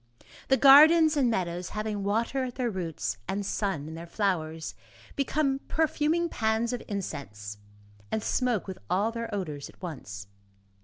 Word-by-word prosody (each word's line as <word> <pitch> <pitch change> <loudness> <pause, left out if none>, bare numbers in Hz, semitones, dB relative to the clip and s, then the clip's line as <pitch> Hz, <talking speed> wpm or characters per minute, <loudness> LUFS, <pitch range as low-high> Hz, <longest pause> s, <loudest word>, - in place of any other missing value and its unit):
The 265 - +4
gardens 310 +4 +8
and 270 -4 +3
meadows, 180 -4 -2
having 215 -1 -3
water 230 +6 0
at 245 - -6
their 245 -3 -1
roots, 165 - -3
and 200 +1 -2
sun 190 -8 -2
in 160 - -7
their 165 +1 -8
flowers, 165 -5 -1 0.4
become 275 -1 +1
perfuming 315 +2 +1
pans 225 -3 0
of 245 - -3
incense, 105 - -5 0.5
and 220 - -1
smoke 245 -6 0
with 190 -2 -7
all 205 +5 +2
their 230 0 -5
odors 155 -9 -4
at - - -18
once. 120 - -7
210 Hz, 150 wpm, -28 LUFS, 170-255 Hz, 0.5 s, gardens